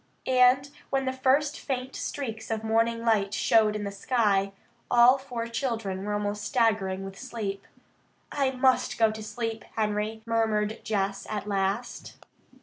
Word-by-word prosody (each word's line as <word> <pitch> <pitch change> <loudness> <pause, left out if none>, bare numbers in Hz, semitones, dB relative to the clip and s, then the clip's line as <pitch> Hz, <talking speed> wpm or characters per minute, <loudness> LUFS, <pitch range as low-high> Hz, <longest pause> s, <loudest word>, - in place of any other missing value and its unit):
And 255 +1 +4 0.2
when 270 -1 0
the 260 - -1
first 275 +3 +1
faint 260 -1 -4
streaks 225 -6 -5
of 220 -1 -2
morning 230 +1 +1
light 205 -3 +2
showed 215 -2 +3
in 210 - -3
the 200 - -3
sky, 200 -2 +1 0.4
all 245 +3 +6
four 245 -4 -5
children 225 -6 -3
were 210 +1 -2
almost 205 0 -2
staggering 205 -5 +1
with 195 0 -9
sleep. 215 -6 -5 0.6
"I 275 -2 +1
must 260 0 +2
go 225 -1 +4
to 220 0 -7
sleep, 225 +1 -4
Henry," 215 0 -1
murmured 220 -1 0
Jess 195 -2 -2
at 210 -2 -3
last. 200 +4 -2
225 Hz, 145 wpm, -27 LUFS, 205-250 Hz, 0.6 s, all